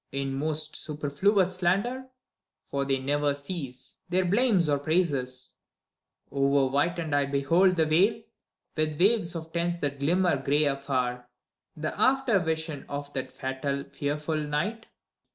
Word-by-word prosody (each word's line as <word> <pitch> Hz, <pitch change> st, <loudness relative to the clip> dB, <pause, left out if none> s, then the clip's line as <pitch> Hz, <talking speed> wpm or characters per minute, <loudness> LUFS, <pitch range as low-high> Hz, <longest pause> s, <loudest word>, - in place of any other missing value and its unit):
In 135 Hz, 0 st, -2 dB
most 155 Hz, +2 st, -2 dB
superfluous 175 Hz, +6 st, +1 dB
slander 200 Hz, +9 st, 0 dB, 0.3 s
— -, -, -44 dB
for 140 Hz, 0 st, 0 dB
they 135 Hz, -1 st, +1 dB
never 145 Hz, +2 st, 0 dB
cease 140 Hz, -4 st, -6 dB
Their 185 Hz, +1 st, +2 dB
blame 210 Hz, +2 st, +3 dB
or 145 Hz, -1 st, +2 dB
praises... 140 Hz, -5 st, -1 dB, 0.7 s
Over 140 Hz, 0 st, +3 dB
whitened 160 Hz, +2 st, 0 dB
I 145 Hz, -1 st, +3 dB
behold 165 Hz, +7 st, +3 dB
The 160 Hz, -2 st, +3 dB
vale, 195 Hz, +9 st, +3 dB, 0.5 s
with 155 Hz, -1 st, 0 dB
waves 195 Hz, -3 st, +3 dB
of 160 Hz, 0 st, -7 dB
tents 170 Hz, 0 st, 0 dB
that 140 Hz, -3 st, -3 dB
glimmer 175 Hz, +2 st, +2 dB
gray 145 Hz, +3 st, +2 dB
afar, 130 Hz, -3 st, -1 dB, 0.5 s
The 155 Hz, 0 st, -3 dB
after 260 Hz, -6 st, +4 dB
vision 160 Hz, -3 st, -3 dB
of 145 Hz, 0 st, -5 dB
that 130 Hz, -1 st, -4 dB
fatal, 135 Hz, +2 st, -3 dB
fearful 150 Hz, +2 st, -2 dB
night. 155 Hz, +10 st, -2 dB
150 Hz, 135 wpm, -27 LUFS, 140-175 Hz, 0.7 s, after